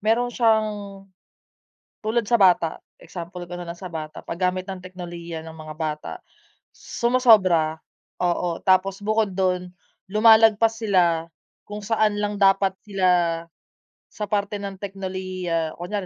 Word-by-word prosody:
Meron 235 +3 +1
siyang, 220 -3 +3 1.3
tulad 220 +2 0
sa 235 - +4
bata. 180 -4 +4 0.2
Example 175 +1 -8
ko 175 - -9
na 175 - -7
lang 170 - -5
sa 185 -2 -8
bata. 155 -2 -7
Paggamit 180 +2 -1
ng 190 - -5
teknolohiya 175 -3 -8
ng 160 0 -10
mga 155 0 -8
bata. 155 -1 -4 0.6
Sumosobra, 210 -10 +3 0.4
oo. 175 -1 0
Tapos 190 +1 +3
bukod 215 0 +1
dun 180 -1 -1 0.4
lumalagpas 220 +2 +5
sila 175 -6 +2 0.4
kung 210 0 -7
saan 215 0 +1
lang 205 0 -2
dapat 195 -1 +3
sila 180 -5 +1 0.7
sa 210 - -5
parte 205 0 -1
ng 195 -1 -6
teknolohiya, 185 -4 -3
kunwari 185 +3 -4
185 Hz, 125 wpm, -23 LUFS, 175-210 Hz, 1.3 s, lumalagpas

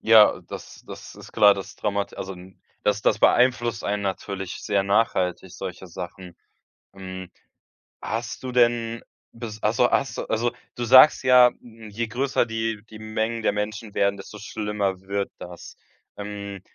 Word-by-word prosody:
Ja, 110 -2 +6
das - - -9
das - - -10
ist - - -13
klar. 105 -2 +6
Das 95 - -8
traumat 100 -1 -2
also 95 +1 -5
n 90 +1 -15 0.2
das 105 +1 +1
das - - +2
beeinflusst 120 -2 +3
einen 100 0 -1
natürlich 95 -1 -4
sehr 100 -2 +1
nachhaltig 95 -3 +1
solche 95 0 -7
Sachen. 90 +1 -9 0.6
Hm, 95 -1 -8 0.7
hast 115 +2 -4
du 130 - -4
denn 120 -1 +2 0.3
bis 115 -2 -8
ach - - +2
so, - - +3
hast - - 0
du - - -1
also, 120 +2 0 0.2
du 120 - -3
sagst 130 +5 +8
ja: 125 -1 +7
„Je 115 -1 -6
größer 130 +1 0
die 115 -2 -3
die 110 - -10
Mengen 110 +1 -2
der 100 - +2
Menschen 105 +1 -4
werden, 100 0 +2
desto 100 +2 -10
schlimmer 105 -2 -2
wird 100 0 -2
das.“ 90 -1 -10 0.4
Ähm 100 -1 -6
105 Hz, 160 wpm, -24 LUFS, 100-115 Hz, 0.7 s, sagst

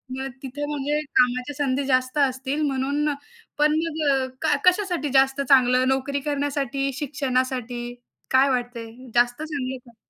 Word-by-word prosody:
मग 265 0 -4 0.2
तिथे 285 +3 -4
म्हणजे 295 0 -1 0.2
कामाची 250 +3 +2
संधी 280 -1 0
जास्त 255 +1 +1
असतील 270 +1 0
म्हणून. 280 +2 0 0.5
पण 300 +1 +3
मग 290 -5 0
क 310 -2 +2
कशासाठी 360 -5 +2
जास्त 270 +1 +4
चांगलं, 255 -1 +5
नोकरी 270 +1 0
करण्यासाठी, 280 -1 -1
शिक्षणासाठी, 255 -4 -2 0.4
काय 265 +1 +5
वाटतंय? 240 -3 -3 0.2
जास्त 245 +3 +2
चांगलं 265 -4 -4
का? 235 - -22
270 Hz, 130 wpm, -24 LUFS, 255-290 Hz, 0.5 s, चांगलं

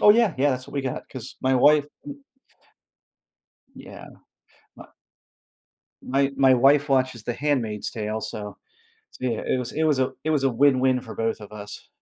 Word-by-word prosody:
Oh 210 - +7
yeah, 225 -4 +4
yeah, 145 +2 +3
that's 130 -1 -4
what - - -13
we 140 - 0
got, 130 -2 -5
'cause 130 -2 -9
my 130 0 +1
wife 145 +3 +5 0.2
y 285 -1 -7 1.6
yeah, - - -11 0.7
my - - -12 1.2
My 135 +1 0
my 130 -1 +5
wife 140 +4 +4
watches 130 -4 +1
The 120 - -2
Handmaid's 125 -8 -2
Tale, 110 0 -4
so 105 -1 -7 0.6
yeah, 120 -3 -2
it 130 - 0
was 125 - -5
it 160 - -1
was 150 -4 +2
a 130 0 0
it 155 - 0
was 145 -3 +1
a 135 - +3
win-win 130 0 +3
for 115 -3 -10
both 115 0 -2
of 105 -1 -12
us 105 -1 -10
130 Hz, 175 wpm, -24 LUFS, 115-145 Hz, 1.6 s, Oh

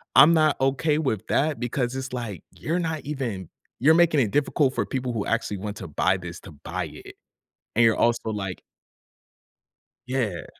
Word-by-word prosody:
I'm 160 +3 +9
not 155 -3 +4
okay 145 +3 +2
with 110 -10 -1
that 150 +1 +1
because 125 +1 -1
it's, 135 -1 -5
like, 115 -8 -5
"You're 170 +3 -2
not 160 -2 -2
even 120 - -4 0.3
you're 155 +6 +6
making 165 -4 +4
it 105 - 0
difficult 145 -1 +2
for - - 0
people 125 -2 -2
who 110 - -2
actually 110 -3 -1
want 105 +2 -5
to 95 - -7
buy 95 +5 +1
this 90 -1 -8
to - - -11
buy 70 - -4
it, - - -11 0.6
and 115 0 +5
you're 110 - +4
also 115 -1 -3
like" 95 -3 -4 1.5
Yeah. 115 -10 -2
125 Hz, 175 wpm, -25 LUFS, 105-145 Hz, 1.5 s, I'm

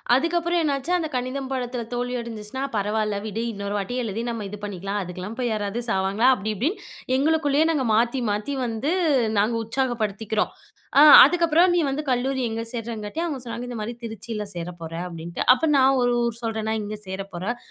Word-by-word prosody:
அதுக்கப்புறம் 340 +4 +1
என்னாச்சு 280 +1 -1
அந்த 330 -3 -2
கணிதம் 255 +2 -3
பாடத்துல 250 -2 -3
தோல்வி 245 +1 -2
அடைஞ்சிருச்சுனா 230 +2 -6
பரவால்ல 210 +1 0
விடு. 220 +1 -3
இன்னொரு 200 0 -4
வாட்டி 205 +5 -3
எழுதி 220 0 -3
நம்ம 230 -3 -4
இது 210 - -7
பண்ணிக்கலாம். 200 0 -3
அதுக்குலாம் 185 +5 -7
போய் 245 -2 0
யாராவது 210 +1 -2
சாவாங்களா? 195 +3 +2
அப்டி 215 -1 -3
இப்டின்னு 295 - -1 0.3
எங்களுக்குள்ளேயே 295 +1 +2
நாங்க 285 -5 0
மாத்தி 235 +4 +2
மாத்தி 210 +7 -2
வந்து 235 +6 -2 0.5
நாங்க 220 +3 +2
உற்சாகப்படுத்திக்கிறோம். 220 -3 -1 0.5
அ - - +9 0.2
அதுக்கப்புறம் 340 +3 +4
நீ - - +3
வந்து 275 +2 -1
கல்லூரி 260 +1 0
எங்க 225 0 -3
சேர்றங்காட்டி 230 +2 -5
அவங்க 310 -6 -3
சொன்னாங்க 240 0 -6
இந்த 245 -1 -5
மாரி 215 +3 -4
"திருச்சியில 220 -1 -5
சேர 170 -1 -5
போறேன்", 165 +1 -5
அப்டின்ட்டு. 170 0 -6
அப்போ 260 +5 -1
நான் 270 0 +5
ஒரு 245 0 +2
ஊர் 235 -1 -2
சொல்றேன். 220 -1 -2
நான் 220 0 0
இங்க 210 +1 -5
சேர 190 +1 -4
போறேன். 195 +8 -3
230 Hz, 175 wpm, -24 LUFS, 210-265 Hz, 0.5 s, அ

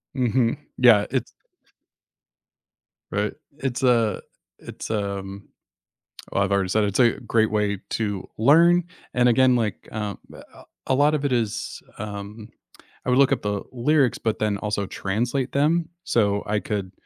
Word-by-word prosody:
Mhm, 125 -2 +1 0.2
yeah, 115 -5 +6
it's - - 0 1.9
Right, 105 +2 -1 0.3
it's 135 -1 -3
a 115 -4 +2 0.4
it's, - - -8
um 100 -2 -4 0.8
oh, - - 0
I've 100 0 +1
already 100 -2 +1
said 110 +3 +2
it's 100 +2 -1
a 120 -2 +6
great 110 -2 +1
way 105 -2 0
to 100 -4 -2
learn, 170 +8 +5 0.3
and 125 0 +4
again 125 +1 +4
like, 110 -3 -2
um, 105 -2 -4 0.2
a - - -15 0.2
a - - +2
lot 145 +3 +3
of 145 -1 -2
it 140 - 0
is, 115 -2 -2 0.2
um 105 +1 -7 0.6
I - - -1
would 125 +2 +3
look 140 - +5
up - - +1
the 105 -1 -1
lyrics, 130 +1 +2
but 110 -2 -2
then 105 -2 0
also 105 -1 -2
translate 120 +8 -2
them, 160 +4 +1
so 100 -3 +1
I 105 0 +1
could 100 -3 -4
110 Hz, 150 wpm, -24 LUFS, 100-125 Hz, 1.9 s, yeah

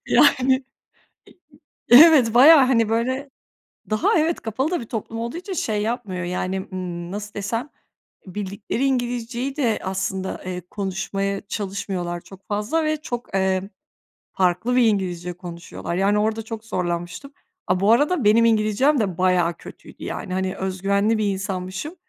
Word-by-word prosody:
Yani, 265 -2 +4 1.3
e 240 - +9
evet, 290 -8 +7
bayağı, 280 +3 +8
hani, 230 -4 +2
böyle, 260 +5 -1 0.6
daha 215 +9 +2
evet, 320 +2 +1
kapalı 260 +8 -2
da 355 - -1
bir 230 - -8
toplum 225 0 -5
olduğu 235 +7 -4
için 365 +3 -6
şey 215 - -1
yapmıyor, 210 -6 -3
yani, 185 +1 -3
ımm, 175 -2 -5
nasıl 205 0 -6
desem, 225 +7 -3 0.6
bildikleri 200 +6 -4
İngilizceyi 245 +1 -2
de 235 -7 +1
aslında, 190 0 -3
eee, 180 -1 -4
konuşmaya 195 0 -3
çalışmıyorlar 190 -4 -4
çok 195 +2 -16
fazla 215 +11 0
ve 310 0 +1
çok, 240 -7 -6
eee, 190 +1 0 0.6
farklı 185 +7 +1
bir 250 - +5
İngilizce 180 -4 -1
konuşuyorlar. 170 -1 -7
Yani, 200 +2 +2
orada 220 +1 0
çok 225 0 -7
zorlanmıştım. 175 +8 -4 0.3
A, 180 0 +1
bu 200 +3 +3
arada 290 +4 +3
benim 225 +3 +5
İngilizcem 225 +6 +3
de 190 -6 -1
bayağı 180 -2 +2
kötüydü, - - -13
yani, 185 - -5
hani, 190 0 -1
öz 190 -1 -4
güvenli 200 +3 +2
bir 215 - 0
insanmışım. 190 - -5
210 Hz, 145 wpm, -22 LUFS, 190-245 Hz, 1.3 s, e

